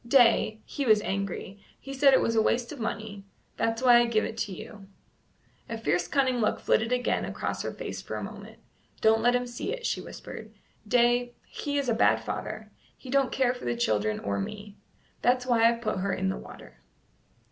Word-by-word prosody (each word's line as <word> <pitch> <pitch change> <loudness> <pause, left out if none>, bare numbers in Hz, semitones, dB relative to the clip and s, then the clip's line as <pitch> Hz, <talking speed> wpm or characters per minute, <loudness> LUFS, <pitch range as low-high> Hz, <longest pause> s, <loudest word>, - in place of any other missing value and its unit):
"Day, 230 -3 +4
he 285 - -4
was 215 -4 +5
angry; 195 0 -4 0.2
he 275 - -8
said 275 +1 +5
it 260 - +5
was 230 - 0
waste 235 +2 +1
of 295 - -8
money; 215 -2 -4 0.3
that's 225 +2 -1
why 245 -2 +7
I 240 - +3
give 220 -2 +1
it - - -5
to 205 - -2
you." 195 +2 -10 0.8
A 230 - -3
fierce 175 -6 0
cunning 260 +1 +1
look 215 - +1
flitted 225 +2 +1
again 250 0 +1
across - - -3
her - - -3
face - - -6
for - - -6
a - - -4
moment. - - -9 0.4
"Don't 220 0 +4
let 245 +2 +4
him 245 0 0
see 240 - -5
it," - - -5
she - - -1
whispered. - - -9 0.4
"Day, 245 0 +2
he 285 -1 -4
is 280 -2 0
a 235 - +2
bad 225 - +4
father; - - -6 0.3
he 255 - -10
don't 275 -1 +2
care 255 -2 +2
for 250 - -9
the 120 0 0
children 110 -2 0
or 100 0 -2
me. 205 - -6 0.5
That's 250 +1 +2
why 230 -2 +4
I've 235 0 -2
put 215 - -1
her 195 +1 -1
in 190 0 -1
the 190 - -1
water." 60 - -12
230 Hz, 200 wpm, -28 LUFS, 205-250 Hz, 0.8 s, why